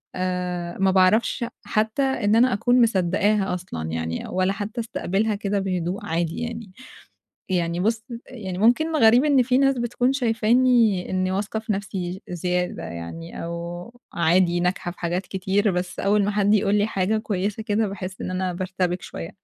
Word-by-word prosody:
آآ، 180 Hz, -1 st, -3 dB
ما 190 Hz, 0 st, +3 dB
باعرفش 195 Hz, +6 st, +3 dB, 0.2 s
حتى 220 Hz, +5 st, 0 dB
إن 230 Hz, -5 st, +1 dB
أنا 250 Hz, 0 st, +4 dB
أكُون 245 Hz, +5 st, +3 dB
مصدقّاها 200 Hz, -1 st, +2 dB
أصلًا 80 Hz, -, -5 dB
يعني، 80 Hz, 0 st, -3 dB
ولا 185 Hz, +1 st, 0 dB
حتى 210 Hz, +4 st, -4 dB
أستقبلها 215 Hz, -1 st, -1 dB
كده 200 Hz, -1 st, -1 dB
بهدوء 190 Hz, +2 st, -2 dB
عادي 165 Hz, -2 st, -2 dB
يعني، 230 Hz, -4 st, -5 dB, 0.8 s
يعني 175 Hz, -2 st, 0 dB
بُص، 225 Hz, +3 st, 0 dB, 0.2 s
يعني 190 Hz, -8 st, -6 dB
ممكن 310 Hz, +9 st, +3 dB
غريب 240 Hz, +1 st, +6 dB
إن 280 Hz, -4 st, +4 dB
في 255 Hz, +1 st, +2 dB
ناس 275 Hz, -2 st, +3 dB
بتكون 240 Hz, +2 st, 0 dB
شايفاني 230 Hz, -4 st, +2 dB
إنّي 185 Hz, 0 st, 0 dB
واثقة 205 Hz, +3 st, -2 dB
في 220 Hz, -1 st, -2 dB
نفسي 190 Hz, -2 st, -4 dB
زيادة 180 Hz, +1 st, -2 dB
يعني 85 Hz, -, -7 dB
أو 170 Hz, +6 st, -6 dB, 0.2 s
عادي 175 Hz, +1 st, +2 dB
ناجحة 180 Hz, 0 st, -1 dB
في 175 Hz, -, -13 dB
حاجات 175 Hz, +2 st, -2 dB
كتير 195 Hz, +2 st, 0 dB
بس 180 Hz, 0 st, -3 dB
أوّل 200 Hz, +1 st, +2 dB
ما 205 Hz, -, 0 dB
حد 205 Hz, 0 st, +2 dB
يقول 205 Hz, -1 st, +2 dB
لي 205 Hz, 0 st, +3 dB
حاجة 205 Hz, +1 st, 0 dB
كويِّسة 205 Hz, 0 st, -2 dB
كده، 215 Hz, -1 st, 0 dB
باحس 190 Hz, -1 st, -7 dB
إن -, -, -4 dB
أنا 185 Hz, 0 st, -1 dB
بارتبِك 185 Hz, 0 st, -2 dB
شويَّة. 165 Hz, -, -7 dB
195 Hz, 165 wpm, -23 LUFS, 180-220 Hz, 0.8 s, غريب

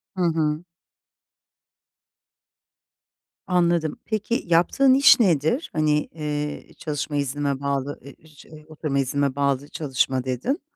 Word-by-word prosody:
Hı 185 Hz, -, -3 dB
hı. 160 Hz, -1 st, 0 dB, 2.8 s
Anladım, 170 Hz, -3 st, +1 dB
peki 220 Hz, +2 st, -2 dB
yaptığın 180 Hz, +11 st, +4 dB
iş 275 Hz, 0 st, +7 dB
nedir? 185 Hz, -, +1 dB
Hani, 150 Hz, -1 st, +1 dB
eee, 150 Hz, -1 st, -4 dB
çalışma 150 Hz, -1 st, -4 dB
iznime 140 Hz, 0 st, -1 dB
bağlı 140 Hz, 0 st, -2 dB
e 140 Hz, -, -11 dB
ı -, -, -18 dB
şey, 155 Hz, 0 st, -15 dB
oturma 155 Hz, -3 st, -2 dB
iznime 140 Hz, 0 st, 0 dB
bağlı 140 Hz, 0 st, 0 dB
çalışma 135 Hz, -4 st, -1 dB
dedin? 130 Hz, -, -2 dB
150 Hz, 110 wpm, -23 LUFS, 140-170 Hz, 2.8 s, iş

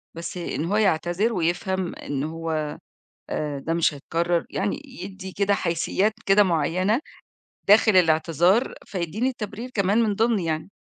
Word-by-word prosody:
بس 170 Hz, +2 st, -6 dB
إن 170 Hz, -2 st, -3 dB
هو 200 Hz, +5 st, 0 dB
يعتذر 195 Hz, +2 st, +1 dB
ويفهم 180 Hz, +1 st, -1 dB
إن 140 Hz, -1 st, -4 dB
هو 160 Hz, -1 st, -3 dB, 0.5 s
آآ، 145 Hz, -2 st, -2 dB
ده 160 Hz, +4 st, -2 dB
مش 165 Hz, -2 st, +2 dB
هيتكرر 170 Hz, +4 st, -1 dB
يعني 200 Hz, +8 st, -2 dB
يدّي 195 Hz, -8 st, -8 dB
كده 200 Hz, +1 st, +2 dB
حيسيات 190 Hz, +5 st, 0 dB
كده 195 Hz, +1 st, +6 dB
معيّنة 185 Hz, -, +1 dB, 0.7 s
داخل 210 Hz, 0 st, +6 dB
الإعتذار، 175 Hz, -, +3 dB
فيدّيني 200 Hz, +8 st, -2 dB
تبرير 215 Hz, +3 st, -6 dB
كمان 200 Hz, +3 st, +2 dB
من 215 Hz, -2 st, +1 dB
ضِمن 225 Hz, +1 st, +2 dB
يعني. 160 Hz, 0 st, -3 dB
185 Hz, 140 wpm, -24 LUFS, 165-205 Hz, 0.7 s, كده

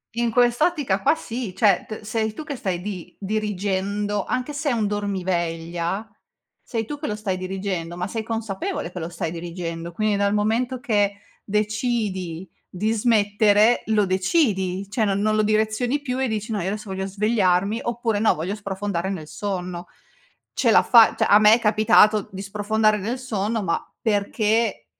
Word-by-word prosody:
In 235 Hz, 0 st, +1 dB
quest'ottica 245 Hz, -, +2 dB
qua 310 Hz, -, +3 dB
sì, 235 Hz, -, -6 dB
cioè 205 Hz, -5 st, +3 dB
t 215 Hz, -, -7 dB
sei 220 Hz, 0 st, -2 dB
tu 310 Hz, -, -7 dB
che 295 Hz, -3 st, -5 dB
stai 185 Hz, -6 st, -2 dB
di 190 Hz, -3 st, -7 dB
dirigendo, 205 Hz, 0 st, -2 dB
anche 255 Hz, +3 st, -2 dB
se 290 Hz, +1 st, -2 dB
è -, -, +1 dB
un 225 Hz, -3 st, 0 dB
dormiveglia 175 Hz, -2 st, -2 dB, 0.6 s
sei 225 Hz, -3 st, -3 dB
tu 290 Hz, +5 st, -6 dB
che 305 Hz, -, -4 dB
lo 210 Hz, -, -2 dB
stai 200 Hz, -3 st, -3 dB
dirigendo, 185 Hz, -2 st, -4 dB
ma 180 Hz, +1 st, -2 dB
sei 225 Hz, +2 st, -4 dB
consapevole 220 Hz, -6 st, -3 dB
che 180 Hz, -, -6 dB
lo 160 Hz, -, -4 dB
stai 170 Hz, -1 st, -4 dB
dirigendo, 170 Hz, 0 st, -5 dB
quindi 215 Hz, +3 st, +1 dB
dal 200 Hz, 0 st, +1 dB
momento 230 Hz, +5 st, 0 dB
che 205 Hz, -6 st, +1 dB, 0.3 s
decidi 210 Hz, -5 st, -2 dB, 0.2 s
di 210 Hz, +5 st, -1 dB
smettere, 215 Hz, 0 st, +3 dB
lo 215 Hz, -2 st, +3 dB
decidi 190 Hz, -, +1 dB
cioè 220 Hz, +1 st, 0 dB
non 200 Hz, -1 st, 0 dB
non 215 Hz, +1 st, +2 dB
lo 215 Hz, -, +3 dB
direzioni 220 Hz, +6 st, +1 dB
più, 255 Hz, -2 st, -3 dB
e 265 Hz, -, +1 dB
dici 220 Hz, 0 st, -3 dB
:"No 210 Hz, -3 st, -1 dB
io 175 Hz, -, -2 dB
adesso 210 Hz, +1 st, -4 dB
voglio 190 Hz, 0 st, -3 dB
svegliarmi", 200 Hz, 0 st, +1 dB
oppure 235 Hz, -3 st, -1 dB
"No, 220 Hz, -, +3 dB
voglio 175 Hz, +6 st, -3 dB
sprofondare 195 Hz, -3 st, -3 dB
nel 170 Hz, -6 st, -5 dB
sonno". 180 Hz, -3 st, -4 dB, 0.7 s
Ce -, -, +2 dB
l'ha -, -, +6 dB
fa 230 Hz, -2 st, +6 dB
cioè -, -, +2 dB
a 205 Hz, -, +7 dB
me 215 Hz, 0 st, +7 dB
è 230 Hz, -, +4 dB
capitato 215 Hz, -1 st, +4 dB
di 190 Hz, -, -5 dB
sprofondare 210 Hz, +2 st, +1 dB
nel 225 Hz, +6 st, -3 dB
sonno, 220 Hz, -3 st, -2 dB
ma 170 Hz, -, 0 dB, 0.2 s
perché 215 Hz, +1 st, 0 dB
210 Hz, 175 wpm, -23 LUFS, 190-225 Hz, 0.7 s, a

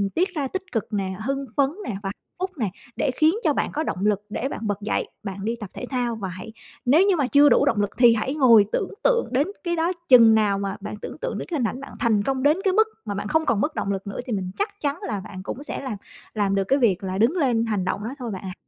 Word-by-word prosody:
tiết 365 Hz, +4 st, +2 dB
ra 280 Hz, -3 st, -1 dB
tích 375 Hz, +6 st, -4 dB
cực 225 Hz, -1 st, -3 dB
nè, 190 Hz, -2 st, -1 dB
hưng 275 Hz, 0 st, -1 dB
phấn 275 Hz, -1 st, +4 dB, 0.2 s
nè -, -, -2 dB
và 195 Hz, -, -3 dB
hạnh -, -, -5 dB, 0.3 s
phúc 375 Hz, +1 st, -1 dB
nè, 215 Hz, -6 st, 0 dB, 0.3 s
để 260 Hz, -, 0 dB
khiến 315 Hz, +5 st, +4 dB
cho 300 Hz, -, +3 dB
bạn -, -, -1 dB
có 310 Hz, +2 st, -1 dB
động 195 Hz, -8 st, -2 dB
lực 205 Hz, -1 st, +2 dB
để 265 Hz, +6 st, -2 dB
bạn -, -, -5 dB
bật 205 Hz, 0 st, -2 dB
dậy 210 Hz, -, -1 dB, 0.2 s
bạn 195 Hz, 0 st, -5 dB
đi 230 Hz, +1 st, 0 dB
tập 205 Hz, -3 st, -7 dB
thể 250 Hz, -, -6 dB
thao. 245 Hz, -3 st, -1 dB
Và 205 Hz, -3 st, -4 dB
hãy 185 Hz, +5 st, -8 dB, 0.3 s
nếu 320 Hz, +10 st, +5 dB
như 390 Hz, -, +4 dB
mà 285 Hz, -6 st, +1 dB
chưa 285 Hz, +2 st, +6 dB
đủ -, -, +4 dB
động 210 Hz, -3 st, +2 dB
lực 205 Hz, -, 0 dB
thì 240 Hz, -2 st, +7 dB
hãy 260 Hz, +6 st, -1 dB
ngồi 235 Hz, -8 st, +6 dB
tưởng -, -, -1 dB
tượng -, -, +3 dB
đến 275 Hz, +6 st, +2 dB, 0.2 s
cái 345 Hz, -1 st, 0 dB
đó 335 Hz, +2 st, +1 dB, 0.2 s
chừng 230 Hz, -3 st, +8 dB
nào 205 Hz, -2 st, +2 dB
mà 195 Hz, 0 st, -3 dB
bạn 210 Hz, +1 st, -5 dB
tưởng -, -, -7 dB
tượng -, -, -3 dB
đến -, -, -5 dB
cái 315 Hz, -, 0 dB
hình 235 Hz, -, +2 dB
ảnh 255 Hz, -, -5 dB
bạn -, -, -10 dB
thành 215 Hz, -4 st, +2 dB
công 265 Hz, +1 st, -1 dB
đến 300 Hz, +4 st, +4 dB
cái 385 Hz, -2 st, +2 dB
mức 440 Hz, +2 st, +4 dB, 0.2 s
mà 205 Hz, -, -3 dB
bạn 200 Hz, -, -3 dB
không 320 Hz, +5 st, +1 dB
còn 225 Hz, -4 st, +1 dB
mất 310 Hz, +1 st, -1 dB
động 200 Hz, -, -1 dB
lực 195 Hz, 0 st, -4 dB
nữa 200 Hz, -, -5 dB
thì 240 Hz, -, -3 dB
mình 185 Hz, -2 st, -2 dB
chắc 410 Hz, +1 st, 0 dB
chắn 290 Hz, +3 st, -1 dB
là 205 Hz, -4 st, -3 dB
bạn 185 Hz, -1 st, -9 dB
cũng 265 Hz, +7 st, -6 dB
sẽ -, -, -4 dB
làm 250 Hz, -7 st, -4 dB, 0.4 s
làm 200 Hz, -2 st, +1 dB
được 195 Hz, -, +2 dB
cái 275 Hz, +1 st, +3 dB
việc 205 Hz, -5 st, +2 dB
là 190 Hz, 0 st, -3 dB
đứng 230 Hz, +7 st, +4 dB
lên 240 Hz, -7 st, +2 dB
hành 205 Hz, -5 st, -1 dB
động 185 Hz, -, -2 dB
đó 225 Hz, -, -3 dB
thôi 235 Hz, -3 st, -4 dB
bạn 190 Hz, -, -5 dB
ạ. 185 Hz, -, -5 dB
235 Hz, 290 wpm, -24 LUFS, 205-285 Hz, 0.4 s, chừng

